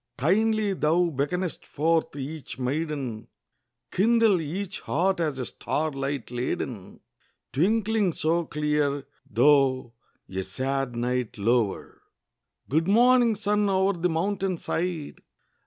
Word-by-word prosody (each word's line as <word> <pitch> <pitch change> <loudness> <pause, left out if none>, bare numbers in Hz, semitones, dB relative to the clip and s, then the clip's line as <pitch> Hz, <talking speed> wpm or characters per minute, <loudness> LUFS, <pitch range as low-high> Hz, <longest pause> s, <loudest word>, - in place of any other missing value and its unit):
Kindly 210 - +2
thou 170 +1 +2
beckonest 160 +6 -2
forth 160 0 0
each 145 +1 -6
maiden; 130 -4 -3 0.6
Kindle 220 -2 +3
each 185 +5 -4
heart 190 +1 0
as 155 -5 -1
a 130 - -3
star 155 +5 -2
light 135 -2 -4
laden, 120 -4 -4 0.5
Twinkling 210 +4 +2
so 165 +2 0
clear, 150 -2 0 0.2
though 130 0 +3 0.3
a 95 0 -3
sad 130 +5 -2
night 125 0 -2
lower! 110 0 0 0.7
Good 160 +5 +1
morning, 240 +2 +5
sun, 210 0 +1
o'er 190 +1 +2
the 180 0 0
mountain 190 +2 -1
side! 165 -3 -3
155 Hz, 110 wpm, -26 LUFS, 135-190 Hz, 0.7 s, morning